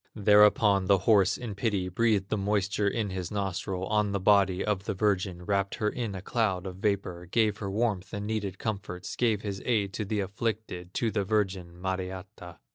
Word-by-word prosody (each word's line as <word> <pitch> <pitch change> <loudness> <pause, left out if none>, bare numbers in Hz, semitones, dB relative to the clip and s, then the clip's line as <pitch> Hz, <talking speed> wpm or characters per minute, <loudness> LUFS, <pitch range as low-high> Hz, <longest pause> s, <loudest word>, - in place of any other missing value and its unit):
Thereupon 105 -1 +5
the 100 0 +5
horse, 95 0 +3
in 120 -4 -5
pity, 100 -3 -1
Breathed 100 0 +1
the - - +1
moisture 100 0 0
of 105 -1 -1
his 90 -2 -4
nostrils 95 -2 -3
On 105 -1 +2
the 100 - 0
body 95 -1 +3
of 105 -2 -1
the - - -2
virgin, 95 -3 0
Wrapped 100 0 0
her 105 - 0
in 115 -5 -4
a 95 - -7
cloud 100 -6 0
of 90 -1 -6
vapor, 95 -3 -2
Gave 105 +2 +1
her 100 - -3
warmth 100 -2 -1
and 100 -1 -4
needed 105 -3 -3
comforts, 95 -4 -4
Gave 110 -4 +1
his 100 -2 -4
aid 105 -5 0
to 105 - -2
the 105 0 -1
afflicted, 100 -2 -4
To 115 -2 0
the 105 -2 0
virgin, 95 -4 -1
Mariatta. 95 -1 -5
100 Hz, 190 wpm, -28 LUFS, 95-105 Hz, -, Thereupon